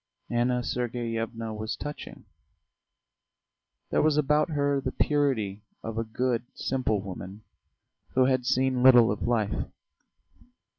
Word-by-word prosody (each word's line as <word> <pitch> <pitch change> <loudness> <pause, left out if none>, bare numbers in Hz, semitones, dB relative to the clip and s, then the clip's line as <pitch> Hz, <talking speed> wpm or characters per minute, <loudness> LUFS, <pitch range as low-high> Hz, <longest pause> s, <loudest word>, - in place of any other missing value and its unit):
Anna 120 +1 +1
Sergeyevna 115 -2 -3
was 110 +1 -4
touching; 145 0 -8 1.7
there - - +3
was 150 -1 +3
about 150 +2 +2
her 145 -2 +1
the - - -2
purity 125 -9 0 0.2
of 115 0 -4
a - - 0
good, 120 +1 -1
simple 125 -5 0
woman 95 +2 -8 0.7
who 130 0 +5
had 130 -1 +2
seen 130 -1 +2
little 125 -4 +7
of 105 - -4
life. 110 -4 0
120 Hz, 115 wpm, -27 LUFS, 110-130 Hz, 1.7 s, little